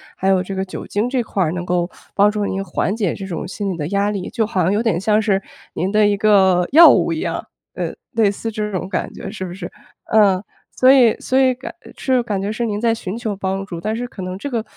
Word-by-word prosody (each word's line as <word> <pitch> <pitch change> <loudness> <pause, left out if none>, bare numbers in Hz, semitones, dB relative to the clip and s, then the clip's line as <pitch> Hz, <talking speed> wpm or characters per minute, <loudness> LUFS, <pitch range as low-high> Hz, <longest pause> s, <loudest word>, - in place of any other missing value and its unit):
还 190 - -2
有 190 -1 +3
这 195 - -6
个 190 - -1
酒 190 - -7
精 215 +4 -1
这 255 -2 0
块 200 -4 -1
儿 155 - 0
能 175 -1 -4
够 175 0 0 0.2
帮 205 +1 +4
助 210 -1 -2
您 195 0 -2
缓 195 +1 -1
解 205 -7 -1
这 195 - -7
种 180 -4 -5
心 200 +1 -3
理 170 - -7
的 150 -1 -3
压 200 +2 0
力。 195 -3 -4
就 225 - 0
好 195 -4 -1
像 180 +3 +2
有 210 +2 +1
点 200 -7 0
像 215 +1 +3
是 205 -3 +1 0.3
您 185 +3 -2
的 210 0 +4
一 205 - +2
个 190 -4 +4
药 330 +4 +9
物 - - +1
一 - - -2
样， - - -3 0.3
呃， - - -4 0.2
类 225 -5 +3
似 225 +3 -4
这 210 -1 -3
种 185 -1 -3
感 - - -3
觉 - - -8
是 190 -3 -6
不 175 -1 -5
是？ 180 -2 -7 0.4
呃， 200 -3 +4 0.3
所 255 +1 +6
以 250 -5 +5
所 260 - -1
以 260 -1 +4
感 250 +2 -8 0.2
这 265 - -1
种 250 -1 +3
感 205 -4 -2
觉 200 +2 -2
是 235 +2 -2
您 210 -2 -2
在 230 0 +2
寻 200 -1 -5
求 220 -4 -3
帮 195 0 -3
助， 175 -4 -7
但 215 +1 -2
是 245 +2 -4
可 200 - -10
能 185 +1 -5
这 285 - -5
个， 230 -3 -2
205 Hz, 290 characters per minute, -19 LUFS, 190-225 Hz, 0.4 s, 药